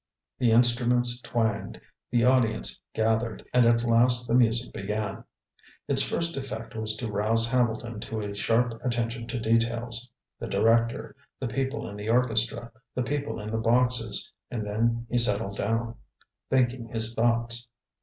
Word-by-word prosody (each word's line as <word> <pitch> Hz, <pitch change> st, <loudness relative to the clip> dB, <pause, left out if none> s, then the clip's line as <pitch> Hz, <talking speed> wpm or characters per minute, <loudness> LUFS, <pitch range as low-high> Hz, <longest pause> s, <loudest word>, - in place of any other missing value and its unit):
The 120 Hz, -, +3 dB
instruments 120 Hz, +1 st, +3 dB
twanged, 110 Hz, -4 st, -2 dB, 0.3 s
the 120 Hz, -1 st, +2 dB
audience 115 Hz, -, +1 dB
gathered, 110 Hz, 0 st, -1 dB
and 125 Hz, -2 st, +5 dB
at 115 Hz, 0 st, +3 dB
last 120 Hz, +1 st, +4 dB
the 115 Hz, -, -1 dB
music 120 Hz, 0 st, +2 dB
began. 105 Hz, 0 st, -4 dB, 0.6 s
Its -, -, +2 dB
first 170 Hz, 0 st, -1 dB
effect 115 Hz, -4 st, -6 dB
was 110 Hz, -1 st, -2 dB
to 110 Hz, 0 st, -4 dB
rouse 110 Hz, +3 st, +2 dB
Hambleton 115 Hz, -2 st, 0 dB
to 110 Hz, +1 st, -5 dB
a 100 Hz, -1 st, -5 dB
sharp 115 Hz, +3 st, 0 dB
attention 120 Hz, -1 st, -2 dB
to 120 Hz, +1 st, -3 dB
details 115 Hz, +1 st, 0 dB, 0.3 s
the -, -, -5 dB
director, 115 Hz, +3 st, +1 dB, 0.2 s
the 130 Hz, -, -2 dB
people 135 Hz, +4 st, -3 dB
in 100 Hz, -, -8 dB
the 105 Hz, +2 st, -5 dB
orchestra, 115 Hz, -1 st, 0 dB, 0.2 s
the 125 Hz, -, 0 dB
people 145 Hz, -1 st, -3 dB
in 105 Hz, +1 st, -6 dB
the 110 Hz, -, -1 dB
boxes; 120 Hz, -1 st, +2 dB, 0.2 s
and 110 Hz, -3 st, -4 dB
then 115 Hz, +3 st, 0 dB
he 120 Hz, +2 st, +2 dB
settled 105 Hz, -3 st, +3 dB
down, 115 Hz, +2 st, -1 dB, 0.6 s
thinking 125 Hz, -2 st, +1 dB
his 115 Hz, 0 st, 0 dB
thoughts. 115 Hz, +1 st, 0 dB
115 Hz, 150 wpm, -27 LUFS, 110-120 Hz, 0.6 s, and